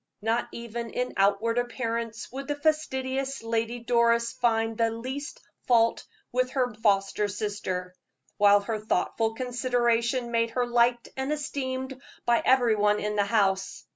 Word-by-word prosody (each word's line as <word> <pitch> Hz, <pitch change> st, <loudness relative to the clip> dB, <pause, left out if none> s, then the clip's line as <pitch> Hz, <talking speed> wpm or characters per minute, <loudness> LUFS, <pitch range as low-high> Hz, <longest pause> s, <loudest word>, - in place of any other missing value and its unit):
Not 230 Hz, +2 st, 0 dB
even 235 Hz, 0 st, -6 dB
in 250 Hz, +2 st, -3 dB
outward 205 Hz, +4 st, +2 dB
appearance 230 Hz, -2 st, -3 dB
could 270 Hz, +2 st, -7 dB
the 290 Hz, -, -1 dB
fastidious 270 Hz, -4 st, -1 dB
Lady 230 Hz, +1 st, -1 dB
Doris 235 Hz, -1 st, +2 dB
find 225 Hz, -1 st, +1 dB
the 230 Hz, 0 st, +2 dB
least 260 Hz, -, -6 dB, 0.3 s
fault 230 Hz, -2 st, +3 dB, 0.3 s
with 255 Hz, +1 st, +1 dB
her 250 Hz, -3 st, 0 dB
foster 205 Hz, -1 st, +1 dB
sister, 200 Hz, -3 st, -4 dB, 0.4 s
while 205 Hz, 0 st, +6 dB
her 215 Hz, +1 st, -3 dB
thoughtful 220 Hz, +2 st, 0 dB
consideration 240 Hz, -1 st, 0 dB
made 230 Hz, 0 st, +1 dB
her 250 Hz, -, +3 dB
liked 240 Hz, 0 st, +2 dB
and 265 Hz, +2 st, -2 dB
esteemed 265 Hz, -3 st, -3 dB, 0.2 s
by 235 Hz, -1 st, +3 dB
every 245 Hz, -4 st, +4 dB
one 210 Hz, 0 st, +2 dB
in 210 Hz, 0 st, -2 dB
the 205 Hz, -1 st, +2 dB
house. 195 Hz, -3 st, 0 dB
235 Hz, 140 wpm, -27 LUFS, 220-255 Hz, 0.4 s, while